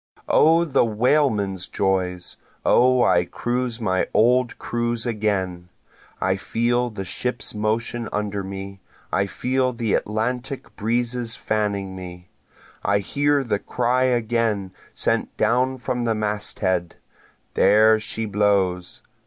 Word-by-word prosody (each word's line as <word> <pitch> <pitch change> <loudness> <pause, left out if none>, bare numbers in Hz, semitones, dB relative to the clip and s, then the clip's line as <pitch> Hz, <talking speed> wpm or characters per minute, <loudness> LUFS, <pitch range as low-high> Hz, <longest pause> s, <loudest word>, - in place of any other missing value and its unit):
O 165 +2 +5
the 150 - +3
whaleman's 110 -5 +1
joys! 90 -2 -1 0.3
O 125 0 +5
I 85 - +4
cruise 120 +6 -2
my 95 -5 0
old 125 +2 +3
cruise 120 0 -2
again! 95 -6 -2 0.5
I 95 0 +1
feel 120 +4 0
the 95 -4 -6
ship's 125 +7 -3
motion 110 +2 -2
under 100 -1 -2
me, 95 0 -7 0.3
I 100 0 +2
feel 130 +4 0
the 115 -3 -1
Atlantic 125 +5 -2
breezes 120 +1 -1
fanning 100 -3 -2
me, 90 -1 -9 0.5
I 100 +2 +2
hear 145 +7 +1
the 105 -5 -1
cry 125 +3 +1
again 115 -5 0 0.2
sent - - 0
down 125 +4 +2
from 120 0 -2
the 115 -1 +1
mast 105 -1 -3
head, 90 -3 0 0.6
There 110 +1 +5
she 110 +1 -4
blows! 100 -3 0
110 Hz, 120 wpm, -23 LUFS, 100-120 Hz, 0.6 s, O